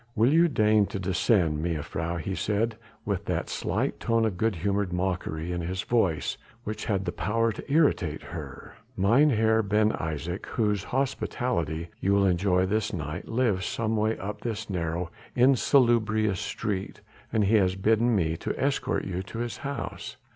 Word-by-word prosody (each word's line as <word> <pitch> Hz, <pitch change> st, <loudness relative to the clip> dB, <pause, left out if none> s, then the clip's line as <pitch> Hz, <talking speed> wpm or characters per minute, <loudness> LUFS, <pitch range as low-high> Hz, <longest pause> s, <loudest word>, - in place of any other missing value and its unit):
"Will 115 Hz, +6 st, +4 dB
you 170 Hz, +2 st, +6 dB
deign 105 Hz, -7 st, +3 dB
to 100 Hz, -, -5 dB
descend, 90 Hz, -4 st, +1 dB
mejuffrouw," 85 Hz, +1 st, -2 dB
he 95 Hz, -, -3 dB
said 105 Hz, +3 st, 0 dB, 0.3 s
with 100 Hz, -3 st, -2 dB
that -, -, -2 dB
slight -, -, -1 dB
tone 115 Hz, -1 st, +2 dB
of 105 Hz, -5 st, -1 dB
good 110 Hz, +3 st, 0 dB
humoured 100 Hz, +2 st, -1 dB
mockery 90 Hz, -2 st, -2 dB
in 90 Hz, 0 st, -2 dB
his 90 Hz, +2 st, -3 dB
voice 95 Hz, -10 st, 0 dB, 0.2 s
which 110 Hz, -1 st, -5 dB
had 100 Hz, -3 st, 0 dB
the -, -, -1 dB
power 115 Hz, +7 st, 0 dB
to 110 Hz, -, -8 dB
irritate 125 Hz, -, +2 dB
her. 75 Hz, -5 st, -8 dB, 0.2 s
"Mynheer 110 Hz, +1 st, +4 dB
Ben 105 Hz, +1 st, +2 dB
Isaje, 80 Hz, +3 st, -4 dB
whose 105 Hz, -3 st, 0 dB
hospitality 120 Hz, -, -1 dB
you 100 Hz, -, +1 dB
will 100 Hz, 0 st, +4 dB
enjoy 90 Hz, 0 st, +2 dB
this 110 Hz, +3 st, 0 dB
night, 75 Hz, -3 st, -4 dB
lives 115 Hz, -6 st, +1 dB
some 110 Hz, -1 st, -1 dB
way 110 Hz, +1 st, +1 dB
up 100 Hz, +2 st, -6 dB
this 110 Hz, -2 st, -4 dB
narrow, 85 Hz, -1 st, -2 dB, 0.2 s
insalubrious 115 Hz, -6 st, +3 dB
street, 100 Hz, -4 st, -3 dB, 0.3 s
and 110 Hz, -2 st, +2 dB
he 105 Hz, +3 st, +4 dB
has 95 Hz, -2 st, +2 dB
bidden 110 Hz, +4 st, +2 dB
me 80 Hz, -4 st, +1 dB
to -, -, -4 dB
escort -, -, 0 dB
you 95 Hz, -1 st, -3 dB
to 95 Hz, +4 st, -8 dB
his 120 Hz, 0 st, -3 dB
house." 140 Hz, 0 st, -5 dB
100 Hz, 160 wpm, -27 LUFS, 90-115 Hz, 0.3 s, you